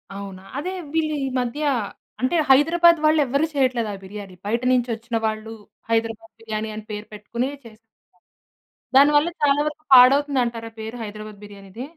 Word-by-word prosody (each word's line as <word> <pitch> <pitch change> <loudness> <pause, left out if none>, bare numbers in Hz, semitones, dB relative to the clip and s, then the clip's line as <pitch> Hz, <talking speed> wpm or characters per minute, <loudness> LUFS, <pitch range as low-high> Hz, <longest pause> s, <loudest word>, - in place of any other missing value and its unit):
అవునా? 195 -2 -8 0.2
అదే 360 +6 -3 0.2
వీళ్ళు 310 -2 0
ఈ - - -2
మధ్య 250 +5 -3 0.6
అంటే 255 +7 +1
హైదరాబాద్ 335 +4 +5
వాళ్ళు 310 0 +4
ఎవ్వరు 280 +5 +1
చేయట్లేదు 255 -5 +1
ఆ - - -5
బిర్యానీ 195 -1 -9
బయట 230 +3 -1
నుంచోచ్చిన 235 -1 -1
వాళ్ళు 215 0 -3 0.4
హైదరాబాద్ 225 0 -1
బిర్యానీ 220 -1 -4
అని 215 - -7
పేరు 210 0 -6
పెట్టుకునే 235 +5 -3 0.2
చేస్తున్నారు. 220 0 -15 1.1
దాని 285 +2 +7
వల్ల 315 +4 +2
చాలా 285 0 +4
వరకు 300 +1 -6
పాడవుతుంది 270 +2 +6
అంటారా? 230 -1 -5
పేరు 220 +2 -6
హైదరాబాద్ 215 -1 -9
బిర్యానీది. 200 +3 -10
235 Hz, 150 wpm, -22 LUFS, 215-280 Hz, 1.1 s, దాని